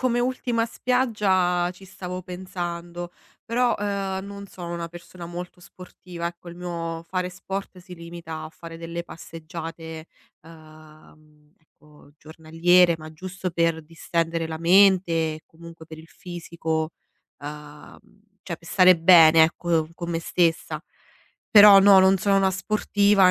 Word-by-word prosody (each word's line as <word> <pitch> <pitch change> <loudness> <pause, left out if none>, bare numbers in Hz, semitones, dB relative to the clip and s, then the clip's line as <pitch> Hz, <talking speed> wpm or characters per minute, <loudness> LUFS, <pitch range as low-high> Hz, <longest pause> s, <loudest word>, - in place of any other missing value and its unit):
come 245 -2 +1
ultima 245 -2 -1
spiaggia, 200 -8 +1
ci 185 +2 -16
stavo 185 -1 -7
pensando. 175 -1 -6 0.3
Però, 240 +1 +1
ehm, 195 -2 -3
non 200 0 -9
sono 175 -3 -8
una 170 -1 -5
persona 175 +1 -11
molto 175 +1 -8
sportiva, 180 -1 -9
ecco, 175 0 -8
il 170 - -10
mio 165 -2 -5
fare 180 +2 -3
sport 190 +1 -7
si 180 0 -12
limita 170 -2 -8
a - - -7
fare 165 0 -11
delle 170 +1 -6
passeggiate, 165 0 -9 0.4
uhm, 155 -1 -18
ecco 150 -2 -22
giornaliere, 165 +3 +2
ma 155 0 -11
giusto 185 +3 -6
per 165 -1 0
distendere 165 +1 -2
la 160 0 -6
mente, 170 -3 +3
comunque 165 0 -14
per 160 -1 -11
il 160 - -13
fisico, 165 -3 -5 0.5
uhm, 150 0 -10 0.4
cioè 170 -3 -6
per 170 - -19
stare 185 0 +5
bene, 165 -1 +7
ecco, 165 -1 +1
con 170 0 -6
me 165 -1 -2
stessa. 165 -1 0 0.7
Però 205 -2 +9
no, 195 0 +7
non 190 +1 +5
sono 195 +2 +2
una 195 -1 +3
sportiva 200 0 +2
170 Hz, 135 wpm, -24 LUFS, 165-190 Hz, 0.7 s, Però